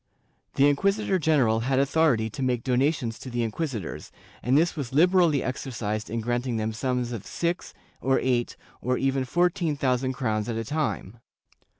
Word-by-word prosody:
The 140 Hz, -, +5 dB
inquisitor 195 Hz, +6 st, +1 dB
general 135 Hz, -9 st, +3 dB
had 130 Hz, +3 st, 0 dB
authority 140 Hz, -4 st, +3 dB
to 135 Hz, -, -6 dB
make 125 Hz, -3 st, 0 dB
donations 130 Hz, -2 st, 0 dB
to 130 Hz, -, -8 dB
the 120 Hz, -1 st, -1 dB
inquisitors, 115 Hz, -, -4 dB, 0.3 s
and 130 Hz, +3 st, +3 dB
this 170 Hz, +3 st, +2 dB
was 135 Hz, -5 st, -5 dB
liberally 170 Hz, -1 st, +4 dB
exercised 115 Hz, -5 st, -3 dB
in 115 Hz, +1 st, -2 dB
granting 120 Hz, +1 st, -1 dB
them 110 Hz, 0 st, -2 dB
sums 125 Hz, +1 st, -1 dB
of 115 Hz, -5 st, -5 dB
six, 170 Hz, +1 st, -2 dB, 0.3 s
or 135 Hz, +1 st, +2 dB
eight, 125 Hz, -2 st, 0 dB, 0.2 s
or 125 Hz, +1 st, 0 dB
even 135 Hz, -1 st, 0 dB
fourteen 175 Hz, +1 st, +1 dB
thousand 130 Hz, -1 st, 0 dB
crowns 110 Hz, -4 st, -1 dB
at 115 Hz, -, -2 dB
a 115 Hz, -, -3 dB
time. 140 Hz, -7 st, -3 dB
130 Hz, 165 wpm, -26 LUFS, 115-150 Hz, 0.3 s, The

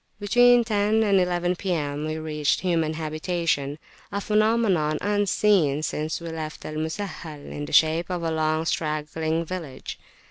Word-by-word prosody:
Between 245 Hz, +3 st, +5 dB
10 215 Hz, 0 st, +2 dB
and 200 Hz, -2 st, +4 dB
11 180 Hz, 0 st, 0 dB
P.M., 150 Hz, -6 st, -2 dB
we 155 Hz, 0 st, -3 dB
reached 150 Hz, -2 st, 0 dB
human 165 Hz, -4 st, 0 dB
habitations 155 Hz, -2 st, -1 dB, 0.3 s
a 200 Hz, -, -1 dB
phenomenon 210 Hz, -7 st, +2 dB
unseen 200 Hz, -7 st, +2 dB
since 155 Hz, 0 st, -2 dB
we 170 Hz, -1 st, -6 dB
left 155 Hz, -1 st, -6 dB
Al 155 Hz, -, -5 dB
Musahhal 160 Hz, -2 st, -5 dB
in 145 Hz, -, -5 dB
the -, -, -9 dB
shape 160 Hz, +2 st, +3 dB
of 180 Hz, -2 st, -3 dB
a 165 Hz, -, 0 dB
long 155 Hz, 0 st, 0 dB
straggling 160 Hz, +1 st, -1 dB
village. 160 Hz, -7 st, -6 dB
165 Hz, 145 wpm, -25 LUFS, 155-195 Hz, 0.3 s, Between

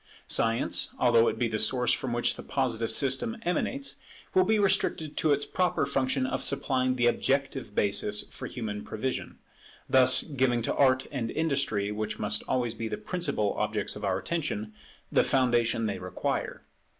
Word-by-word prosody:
Science, 115 Hz, +1 st, +1 dB
although 115 Hz, -2 st, +4 dB
it -, -, -1 dB
be 120 Hz, -, +1 dB
the 110 Hz, -1 st, -3 dB
source 125 Hz, +3 st, +2 dB
from 130 Hz, -, -3 dB
which 120 Hz, 0 st, 0 dB
the -, -, -8 dB
Positive 115 Hz, -4 st, -1 dB
system 135 Hz, -, +2 dB
emanates, 270 Hz, +10 st, -2 dB, 0.4 s
will 375 Hz, -, +5 dB
be 220 Hz, -, +2 dB
restricted 190 Hz, -6 st, +1 dB
to 155 Hz, -, +1 dB
its 145 Hz, 0 st, +1 dB
proper 180 Hz, -5 st, 0 dB
function 135 Hz, -1 st, 0 dB
of -, -, -2 dB
supplying 130 Hz, -2 st, +1 dB
the 120 Hz, -1 st, +1 dB
objective 135 Hz, -1 st, 0 dB
basis 105 Hz, +1 st, 0 dB
for -, -, -7 dB
human 105 Hz, -4 st, -5 dB
prevision; 130 Hz, +4 st, -4 dB, 0.5 s
thus 130 Hz, -1 st, +6 dB
giving 130 Hz, -5 st, 0 dB
to -, -, 0 dB
Art 130 Hz, -1 st, +3 dB
and 125 Hz, -5 st, -3 dB
Industry, 135 Hz, -11 st, -1 dB
which 105 Hz, 0 st, -3 dB
must 105 Hz, -, +2 dB
always 125 Hz, -3 st, 0 dB
be 115 Hz, 0 st, -5 dB
the -, -, -4 dB
principal 175 Hz, -, -1 dB
objects 105 Hz, 0 st, -2 dB
of 105 Hz, -, -9 dB
our 95 Hz, -2 st, 0 dB
attention, 110 Hz, -, -3 dB, 0.4 s
the -, -, +4 dB
foundation 120 Hz, -3 st, +1 dB
they 105 Hz, -2 st, -3 dB
require. 90 Hz, -1 st, -3 dB
125 Hz, 165 wpm, -28 LUFS, 110-140 Hz, 0.5 s, thus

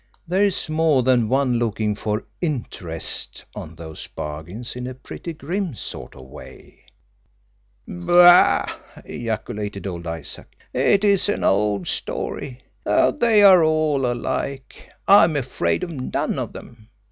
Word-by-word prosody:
There's 190 Hz, +1 st, +1 dB
more 155 Hz, -4 st, +2 dB
than 120 Hz, -3 st, +2 dB
one 130 Hz, -2 st, +1 dB
looking 110 Hz, -2 st, -1 dB
for 105 Hz, +2 st, -3 dB, 0.2 s
'interest' 115 Hz, -, -3 dB
on 80 Hz, +1 st, -9 dB
those 80 Hz, -1 st, -9 dB
bargains 85 Hz, +12 st, -7 dB
in 125 Hz, 0 st, -5 dB
a 130 Hz, -, -7 dB
pretty 130 Hz, +6 st, -8 dB
grim 170 Hz, -, -4 dB
sort -, -, -8 dB
of 65 Hz, -, -12 dB
way." 65 Hz, -, -14 dB, 1.0 s
"Bah!" 175 Hz, -, +6 dB, 0.4 s
ejaculated 105 Hz, -3 st, -5 dB
old 85 Hz, -3 st, -5 dB
Isaac. 80 Hz, -3 st, -7 dB, 0.2 s
"It 200 Hz, 0 st, +2 dB
is 200 Hz, -1 st, +3 dB
an -, -, -1 dB
old 100 Hz, -2 st, +1 dB
story. 130 Hz, -1 st, -4 dB, 0.2 s
They 230 Hz, -6 st, +3 dB
are 185 Hz, -4 st, +8 dB
all 155 Hz, -4 st, +1 dB
alike. 130 Hz, +2 st, -5 dB, 0.2 s
I 200 Hz, -2 st, +8 dB
am 165 Hz, -2 st, -2 dB
afraid 135 Hz, +6 st, -1 dB
of 175 Hz, -, -4 dB
none 130 Hz, -5 st, -3 dB
of -, -, -4 dB
them. 110 Hz, -1 st, -13 dB
125 Hz, 130 wpm, -22 LUFS, 105-165 Hz, 1.0 s, are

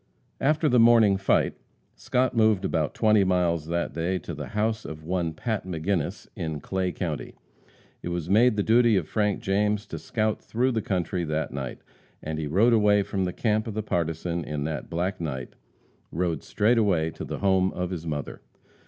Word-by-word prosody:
After 155 Hz, +3 st, +2 dB
the 125 Hz, -3 st, +4 dB
morning 115 Hz, -3 st, +6 dB
fight, 95 Hz, 0 st, +2 dB, 0.4 s
Scott 125 Hz, 0 st, 0 dB
moved 110 Hz, -4 st, +3 dB
about 80 Hz, -5 st, -1 dB
twenty 110 Hz, -2 st, +4 dB
miles 85 Hz, -4 st, +1 dB
that 85 Hz, -3 st, -2 dB
day 85 Hz, +4 st, -1 dB
to 85 Hz, -, -7 dB
the 75 Hz, -1 st, -6 dB
house 110 Hz, +1 st, -1 dB
of 80 Hz, 0 st, -8 dB
one 85 Hz, 0 st, -1 dB
Pat 110 Hz, +7 st, -3 dB
McGinnis, 90 Hz, -1 st, -2 dB
in 80 Hz, -2 st, -4 dB
Clay 95 Hz, +3 st, -2 dB
county. 80 Hz, -4 st, -4 dB, 0.7 s
It -, -, -5 dB
was 85 Hz, -2 st, -3 dB
made 110 Hz, +5 st, +4 dB
the 105 Hz, -, +1 dB
duty 115 Hz, -1 st, +4 dB
of 85 Hz, -5 st, -1 dB
Frank 105 Hz, +1 st, 0 dB
James 105 Hz, +2 st, 0 dB
to -, -, -7 dB
scout 110 Hz, -1 st, -1 dB
through 125 Hz, +3 st, 0 dB
the 115 Hz, -2 st, -1 dB
country 90 Hz, -2 st, -1 dB
that 80 Hz, 0 st, -2 dB
night, 65 Hz, -3 st, -5 dB, 0.4 s
and 80 Hz, 0 st, -3 dB
he 75 Hz, -, -2 dB
rode 105 Hz, +10 st, +4 dB
away 105 Hz, -2 st, +4 dB
from 95 Hz, -1 st, -2 dB
the 90 Hz, -, -1 dB
camp 110 Hz, -1 st, 0 dB
of 110 Hz, -, -5 dB
the 110 Hz, -, -2 dB
partisan 85 Hz, -2 st, -2 dB
in 75 Hz, -1 st, -4 dB
the 75 Hz, 0 st, -3 dB
black 90 Hz, +2 st, -2 dB
night 65 Hz, -6 st, -4 dB, 0.6 s
rode 85 Hz, 0 st, -1 dB
straightway 105 Hz, -8 st, +2 dB
to -, -, -8 dB
the -, -, -5 dB
home 95 Hz, -1 st, +2 dB
of 90 Hz, 0 st, -3 dB
his 85 Hz, -2 st, -5 dB
mother. 75 Hz, -2 st, -4 dB
95 Hz, 185 wpm, -26 LUFS, 80-110 Hz, 0.7 s, morning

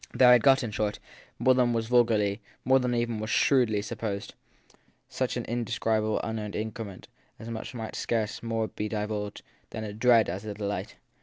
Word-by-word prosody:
They 130 Hz, -, +6 dB
had 125 Hz, -1 st, +8 dB
got, 135 Hz, 0 st, +5 dB
in 115 Hz, -, -3 dB
short, 105 Hz, 0 st, -1 dB, 0.4 s
more 130 Hz, -, +4 dB
than 125 Hz, -2 st, +2 dB
was 115 Hz, -1 st, 0 dB
vul 120 Hz, +1 st, +5 dB
garly, 105 Hz, -2 st, 0 dB, 0.3 s
more 130 Hz, +1 st, +5 dB
than 125 Hz, -1 st, 0 dB
was 120 Hz, -, +2 dB
even 115 Hz, -2 st, -2 dB
shrewdly 115 Hz, -4 st, +3 dB
supposed 105 Hz, -2 st, -4 dB, 0.7 s
such -, -, -2 dB
an -, -, -3 dB
inde 120 Hz, 0 st, -2 dB
scribable 110 Hz, -2 st, 0 dB
unearned 110 Hz, -2 st, -4 dB
increment 110 Hz, -3 st, -5 dB, 0.3 s
as 110 Hz, -, -10 dB
might 110 Hz, 0 st, -6 dB
scarce 110 Hz, -2 st, -1 dB
more 115 Hz, -1 st, -1 dB
be 105 Hz, 0 st, -4 dB
divulged 105 Hz, -1 st, -3 dB, 0.3 s
as 110 Hz, -, -5 dB
a 105 Hz, -1 st, -5 dB
dread 115 Hz, 0 st, +5 dB
than 85 Hz, -, -3 dB
as 100 Hz, -, -8 dB
a 105 Hz, -1 st, -5 dB
delight. 100 Hz, 0 st, -4 dB
110 Hz, 185 wpm, -28 LUFS, 105-120 Hz, 0.7 s, had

